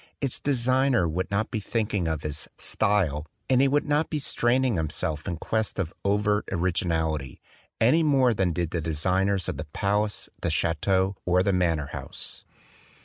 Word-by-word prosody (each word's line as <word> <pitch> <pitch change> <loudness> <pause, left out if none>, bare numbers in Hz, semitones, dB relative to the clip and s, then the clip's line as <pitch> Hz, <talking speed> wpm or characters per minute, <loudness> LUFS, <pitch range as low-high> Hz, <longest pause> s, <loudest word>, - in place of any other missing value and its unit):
Its 135 -3 -2
designer 130 -5 +2
would 90 +4 -2
not 105 +2 -1
be 110 - -1
thinking 105 -4 -1
of 80 -2 -2
his 75 0 -3
"style"; 90 -8 +1 0.2
and 130 0 +4
he 140 - +5
would 145 +2 +1
not 150 +2 +1
be 155 - -1
straining 130 -3 +1
himself 80 -1 -2
in 85 - -2
quest 110 +5 -2
of 90 -5 -2
overt 105 +1 +1
origi 90 0 0
nality, 80 -5 -1 0.4
any 130 +9 +4
more 135 -6 +4
than 95 -4 +1
did 85 -1 -2
the 85 - -1
designers 90 +4 0
of - - -3
the 75 - -5
palace, 100 +7 -1
the 85 - 0
chateau 95 +4 +1
or 90 +1 +3
the 100 - +1
manor 85 -5 +1
house. - - -5
95 Hz, 170 wpm, -26 LUFS, 80-115 Hz, 0.4 s, he